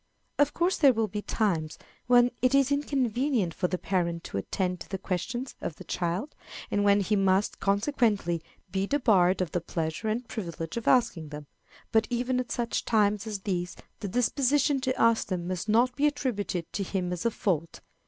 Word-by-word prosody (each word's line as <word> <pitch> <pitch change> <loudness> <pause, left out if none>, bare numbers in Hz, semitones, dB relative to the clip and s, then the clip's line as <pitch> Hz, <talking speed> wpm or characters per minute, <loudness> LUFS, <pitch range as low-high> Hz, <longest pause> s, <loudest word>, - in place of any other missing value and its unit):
Of 290 0 +3
course 350 +2 +1
there 275 -4 +6
will 225 -1 0
be 210 +1 -4
times 170 -9 -1 0.3
when 245 0 +5
it 255 +2 +3
is 275 0 +3
inconvenient 260 - 0
for 180 - 0
the 180 - -2
parent 170 -3 -1
to 100 - -4
attend 180 - -2
to - - -10
the 195 - -3
questions 230 +7 -3
of 155 - -4
the - - -11
child, 180 - -2 0.4
and 205 - +1
when 200 0 +4
he 210 +2 +1
must, 195 0 +2
consequently, 200 - +1 0.3
be 195 +2 -1
debarred 195 -10 +3
of 175 -5 -2
the 175 - -1
pleasure 165 +4 -3
and 230 +3 -2
privilege 170 -8 -5
of 235 - -4
asking 175 - +2
them; 150 0 -8 0.5
but 220 0 +3
even 250 +1 0
at 250 - -4
such 235 -1 -1
times 210 -1 +2
as 210 -3 -4
these 180 -3 -2 0.2
the 205 - -4
disposition 270 +5 +2
to 260 0 -1
ask 230 -1 +3
them 175 -2 -3
must 185 +3 -3
not 245 +3 +3
be 290 +1 +3
attributed 205 - -2
to - - -2
him 185 -2 -2
as 175 - -4
a 235 - +3
fault. 170 -7 -2
205 Hz, 190 wpm, -28 LUFS, 180-245 Hz, 0.5 s, there